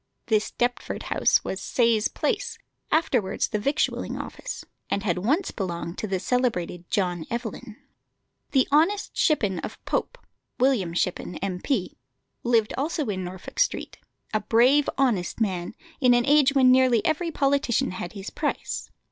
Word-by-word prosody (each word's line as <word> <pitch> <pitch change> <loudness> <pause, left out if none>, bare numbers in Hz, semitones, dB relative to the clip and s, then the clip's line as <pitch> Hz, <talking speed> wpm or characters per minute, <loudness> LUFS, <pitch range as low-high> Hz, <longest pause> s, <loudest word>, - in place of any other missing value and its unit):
This 215 -2 +1
Deptford 245 0 -2
house - - +3
was 190 - -4
Sayes 230 -2 +2
Place, 420 -4 -2 0.3
afterwards 245 -11 +1
the 210 - -1
Victualling 280 +8 -1
Office, - - -6 0.2
and 200 - -1
had 180 -3 0
once 290 - +1
belonged 170 -3 -4
to 215 - -2
the 190 -2 -1
celebrated 180 -7 -1
John 180 -4 0
Evelyn. 235 -1 -5 0.7
The 265 -2 +3
"Honest 335 +8 +2
Shippen" 205 - +2
of - - -6
Pope - - -1 0.4
William 230 -11 +2
Shippen, 180 0 -1
M.P. 190 +3 -2 0.4
lived 230 -3 +2
also 300 +1 -1
in 190 -2 -2
Norfolk 180 +1 -8
Street: - - 0 0.3
a 215 - +3
brave, 250 +7 +4
honest 235 -11 +1
man, 185 -3 -1 0.2
in 250 -3 +5
an 240 0 +2
age 285 -1 +4
when 260 -2 +6
nearly 255 -4 +4
every 325 +2 +1
politician 275 - +1
had 180 -1 -6
his 195 -2 -7
price. 295 -1 -3
235 Hz, 145 wpm, -25 LUFS, 190-275 Hz, 0.7 s, when